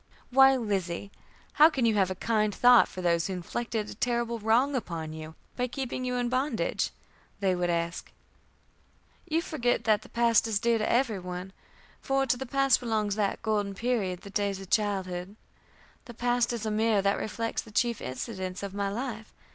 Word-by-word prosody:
"Why, 270 +1 +7
Lizzie, 200 -5 -2 0.4
how 310 +2 +7
can 270 -7 0
you 225 - +3
have 195 -3 +2
a 185 - -3
kind 215 0 0
thought 245 0 +6
for 185 - -8
those 170 -1 +2
who 190 - -3
inflicted 215 +4 -3
a - - -7
terrible 235 +1 -1
wrong 230 +6 +2
upon 165 -9 -4
you 160 0 -8 0.2
by 250 0 -1
keeping 255 0 -4
you 250 0 -1
in 245 -1 0
bondage?" 260 +4 0 0.5
they 190 -2 +2
would 175 -1 -1
ask. 170 0 -2 1.2
"You 325 +2 +1
forget 245 -8 0
the 215 -2 +3
past 235 -1 +3
is 215 -3 +1
dear 235 0 +2
to 215 - 0
every 235 -5 +1
one, 180 +1 -7 0.5
for 270 0 +1
to 255 - +2
the 265 +1 -6
past 275 +1 +3
belongs 215 -4 -1
that 205 -2 -1
golden 205 -2 0
period, 200 -6 -1
the 200 - -11
days 200 -1 -1
of 195 0 -11
childhood. 190 -2 -1 0.7
The 240 - -11
past 245 0 +1
is 230 -2 -4
a 215 - -1
mirror 215 -2 +2
that 200 0 +2
reflects 230 +1 -3
the - - -14
chief 235 +1 0
incidents 185 - -5
of 200 -1 -5
my 200 0 -1
life. 220 0 -5
220 Hz, 185 wpm, -28 LUFS, 195-245 Hz, 1.2 s, Why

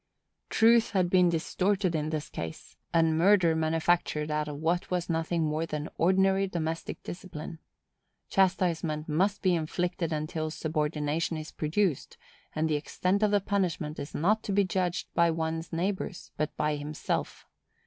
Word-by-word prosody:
Truth 230 0 +5
has 185 -2 +3
been 180 -1 +5
distorted 185 +3 0
in 155 -1 -1
this 155 -1 -3
case, 80 -1 -7 0.2
and 165 -1 +3
murder 180 -3 +5
manufactured 160 -1 +1
out 150 0 0
of 145 -1 -5
what 165 +4 0
was 180 -1 -1
nothing 165 +1 0
more 155 +1 -1
than 150 0 -4
ordinary 190 +2 +3
domestic 165 -2 -4
discipline. 170 -3 -7 0.7
Chastisement 175 -5 +1
must 190 +6 +1
be 185 -2 +4
inflicted 170 +1 -1
until 155 +1 -2
subordination 155 0 -1
is 155 0 -7
produced; 160 0 -1 0.4
and 155 +1 +1
the 155 -1 +1
extent 185 +6 -1
of 210 - +4
the 205 0 +3
punishment 180 -6 -1
is 140 - -6
not 210 +8 +2
to 205 - -4
be 200 +1 +4
judged 180 -2 -1
of - - -50
by 170 0 +4
one's 160 0 -2
neighbors, 185 +2 -3
but 150 0 -3
by 150 0 0
himself. 150 +1 -3
165 Hz, 155 wpm, -29 LUFS, 155-185 Hz, 0.7 s, Truth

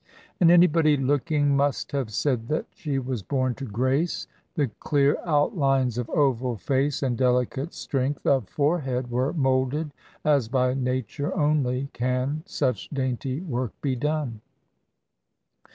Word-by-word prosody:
And 170 - +6
anybody 165 -3 +5
looking 145 +1 +1
must 140 0 0
have 135 -5 -2
said 115 0 0
that 155 - -1
she 150 -8 -3
was 130 -3 -3
born 130 +6 0
to 135 - -7
grace. 130 - 0 0.3
The 140 -6 0
clear 145 -1 +2
outlines 135 - +2
of 120 - -4
oval 130 -4 +1
face 135 +6 0
and 125 -3 0
delicate 125 +4 +1
strength 135 +1 -2
of 130 -7 +2
forehead 135 -5 0
were 130 +4 +1
moulded 135 0 0 0.3
as 145 -6 +3
by 125 +1 +1
Nature 130 +2 -2
only 140 -3 +1
can 130 +4 -1
such 125 -8 -1
dainty 130 0 -2
work 130 - -4
be 135 -3 0
done. 145 -4 -2
135 Hz, 135 wpm, -25 LUFS, 125-145 Hz, 0.3 s, And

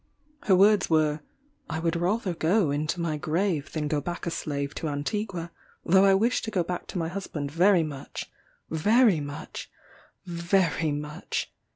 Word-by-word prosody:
Her 190 - +5
words 200 +1 +5
were, 155 -2 +2 0.5
"I 160 - -2
would 165 +1 0
rather 185 +3 0
go 170 0 +2
into 150 +4 -1
my 165 -3 -1
grave 160 0 -1
than 150 -2 -2
go 150 -1 0
back 175 +4 -5
a 170 - -1
slave 140 -3 -3
to 160 - -3
Antigua, 170 +4 -3 0.3
though 190 +3 +5
I 195 -1 +6
wish 230 +6 +2
to 225 - -4
go 190 -5 0
back 175 +1 -5
to - - -5
my 165 -2 -1
husband 165 -6 -5
very 175 +2 +4
much 145 -3 -6 0.4
very 210 +3 +4
much 145 0 -7 0.6
very 170 -3 +1
much! 150 +1 -4
170 Hz, 165 wpm, -27 LUFS, 150-190 Hz, 0.6 s, I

